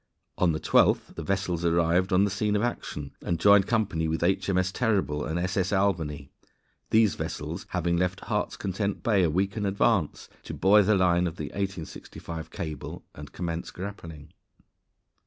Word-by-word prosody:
On 90 -2 +4
the 80 - -2
12th - - +3
the - - -6
vessels 90 -1 -1
arrived 85 +3 +2
on 95 +1 +4
the 100 - +1
scene 105 +1 0
of 105 - +1
action, 75 -11 -4
and 85 -2 -2
joined 100 0 +6
company 100 -8 0
with 80 +1 -1
H.M.S. 95 0 +1
Terrible 95 -10 0
and 80 +2 -2
S.S. 90 +1 -1
Albany, 80 -8 -1 0.6
these 110 -2 +4
vessels 80 +1 -5
having 85 -1 0
left 90 +1 -1
Heart's - - -2
Content 100 +1 -3
Bay 105 -4 +3
a 85 - +3
week 95 +5 0
in 105 - -1
advance 100 -3 +1
to - - -7
buoy 105 +2 +5
the 105 +2 +3
line 90 -1 +3
of 85 - -5
the 75 -3 -5
1865 85 -3 -6
cable 75 -4 -6
and - - -10
commence 85 -2 -4
grappling. 85 -6 -8
90 Hz, 165 wpm, -27 LUFS, 80-100 Hz, 0.6 s, joined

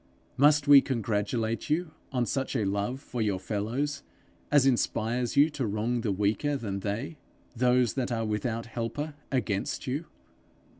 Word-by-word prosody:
Must 145 +2 +4
we 140 -1 +9
congratulate 115 -1 -1
you 160 +2 0 0.2
on 125 -2 +1
such 135 +4 -2
a 110 -5 +1
love 100 +6 -1
for 125 -3 -5
your 105 -3 +1
fellows 120 +9 -2 0.5
as 145 -2 +5
inspires 120 -1 0
you 150 +3 +6
to 140 -5 -2
wrong 110 +4 -1
the 110 - 0
weaker 105 +9 0
than 100 -6 -4
they, 110 - -4 0.4
those 125 0 +3
that 130 -2 -2
are 115 -1 -1
without 110 +2 -2
helper 120 +6 -4 0.2
against 110 -7 -1
you? 140 +6 -2
120 Hz, 150 wpm, -28 LUFS, 110-140 Hz, 0.5 s, we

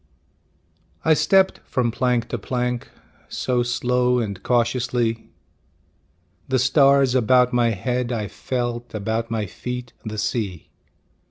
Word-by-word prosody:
I 160 - +6
stepped 190 +5 +3
from 120 -2 -1
plank 125 -1 0
to 120 - -3
plank 125 +2 -2 0.4
So 125 -1 0
slow 125 +1 +1
and 100 -5 -3
cautiously; 120 -1 0 1.2
The 130 - +1
stars 135 0 +4
about 125 0 +4
my 120 -1 +3
head 120 +4 -2
I 110 -4 -2
felt, 120 +1 -4
About 110 +2 -2
my 110 -2 -1
feet 125 +4 -6
the 110 -1 -5
sea. 100 -6 -3
120 Hz, 115 wpm, -22 LUFS, 115-125 Hz, 1.2 s, I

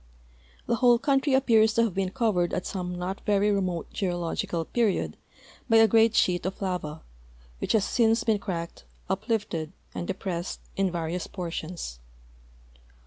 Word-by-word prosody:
The 235 - +1
whole 245 -1 +5
country 275 +2 +1
apj^ears 225 -5 +4
to 230 - +4
have 225 -5 0
been 190 0 0
covered 195 -6 +1
at 180 - -3
some 180 -2 -4
not 185 +2 -4
very 205 0 +2
remote 185 -4 -2
geological 175 -2 -2
period 225 -2 0 0.5
b}'' 225 0 +6
a - - +6
great 225 +1 +4
sheet 175 -1 +3
of 190 - -5
lava, 175 -5 -3 0.6
which - - -1
has 215 -3 +3
since 225 -1 +2
been 220 -2 +2
cracked, 170 -4 -5 0.3
uplifted, 195 -6 -2 0.2
and 175 - -4
depressed 185 -2 -3 0.2
in 195 -1 +1
various 170 0 -3
portions. 165 - -5
195 Hz, 145 wpm, -27 LUFS, 175-225 Hz, 0.6 s, b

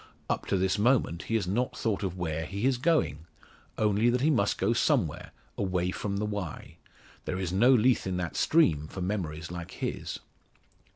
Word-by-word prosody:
Up - - -2
to 95 - +1
this 95 +2 +1
moment 105 -7 +2
he 115 - -1
has 110 -5 +1
not 115 +8 -1
thought 110 -4 -1
of 95 -2 -3
where 80 -3 -2
he 100 +4 -3
is 130 -2 +2
going; 125 - +1 0.5
only 105 +2 +3
that 125 +1 +1
he 155 +3 +3
must 100 -8 +1
go 100 +5 +2
somewhere - - +1 0.3
away 90 -2 0
from 100 +1 -3
the 105 - -1
Wye. 100 -6 -5 0.5
There 95 - -2
is 95 -2 -3
no 115 +7 +4
Lethe 125 -3 +3
in 90 -1 -1
that 90 -2 -3
stream 80 - +3
for 95 - -7
memories 85 -4 -3
like 85 -1 -7
his. - - -4
100 Hz, 185 wpm, -29 LUFS, 90-115 Hz, 0.5 s, no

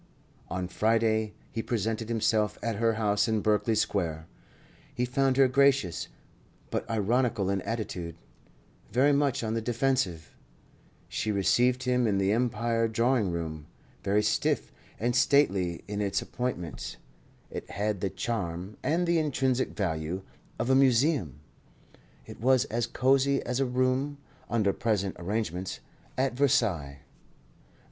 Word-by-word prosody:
On 90 0 -3
Friday 110 +2 +1 0.2
he 115 - -2
presented 115 0 -2
himself 110 -2 +1
at 115 -3 -1
her 115 0 +2
house 105 0 +1
in 110 -1 +1
Berkeley 110 +2 +2
Square. 80 -7 -1 0.7
He 125 - +1
found 130 +1 +1
her 135 -1 +6
gracious, 135 -8 +2 0.6
but - - -3
ironical 110 -2 +1
in 100 -1 0
attitude, 90 -8 -4 0.8
very 135 +5 +4
much 140 -4 +1
on 110 0 -1
the 115 - -1
defensive. 115 - -1 0.7
She 110 - -2
received 125 +6 +2
him 125 -2 +2
in 100 -2 +1
the 95 0 +2
Empire 115 0 +1
drawing 115 -1 +1
room 80 -3 -4 0.4
very 105 +2 +2
stiff - - 0 0.3
and 120 +2 0
stately 100 - +2
in 105 0 -3
its 100 -1 0
appointments. 120 - -4 0.5
It - - -6
had 105 -2 -2
the 100 - 0
charm 95 -4 -4
(and 170 +3 +1
the 170 -1 +2
intrinsic 130 -4 0
value) 85 -1 -2 0.3
of 125 - 0
a - - +5
museum; 130 - +3 0.8
it - - -11
was 130 0 +4
as 120 0 0
cosy 135 +1 +2
as 125 +1 -2
a 135 - +2
room 130 +3 0 0.3
(under 110 -4 +2
present 100 -4 -1
arrangements) 95 -1 -3 0.4
at 130 0 +1
Versailles. 95 - +1
115 Hz, 135 wpm, -28 LUFS, 100-125 Hz, 0.8 s, her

